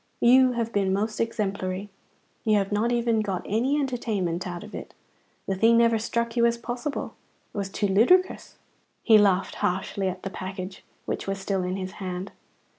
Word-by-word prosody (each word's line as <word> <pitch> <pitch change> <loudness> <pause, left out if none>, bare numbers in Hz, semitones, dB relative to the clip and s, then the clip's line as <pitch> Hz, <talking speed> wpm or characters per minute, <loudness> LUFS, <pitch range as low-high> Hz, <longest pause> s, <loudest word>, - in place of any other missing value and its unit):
You 255 +1 +6
have 230 -1 -2
been 195 -2 +1
most 215 +3 -1
exemplary; 200 -3 -2 0.5
you 215 -1 +3
have 195 0 -1
not 215 +3 +1
even 235 -2 +2
got 195 -4 -3
any 255 +8 +1
entertainment 205 - -2
out 175 +2 -6
of 215 - -12
it. - - -8 0.5
The 195 - -1
thing 225 +4 +4
never 230 -1 +4
struck 235 +1 -2
you 235 -1 +4
as 235 0 0
possible. 240 +4 -4 0.4
It - - -8
was 195 -1 -3
too 205 - -2
ludicrous!" 250 - +3 0.5
He 220 -2 +7
laughed 195 -2 +2
harshly 190 +1 -1
at 185 0 -7
the 195 - -4
package, 190 0 -6 0.2
which - - -4
was 195 0 -1
still 195 -1 -1
in 180 +1 -2
his 185 -1 -4
hand. 185 0 -4
210 Hz, 180 wpm, -26 LUFS, 190-235 Hz, 0.5 s, He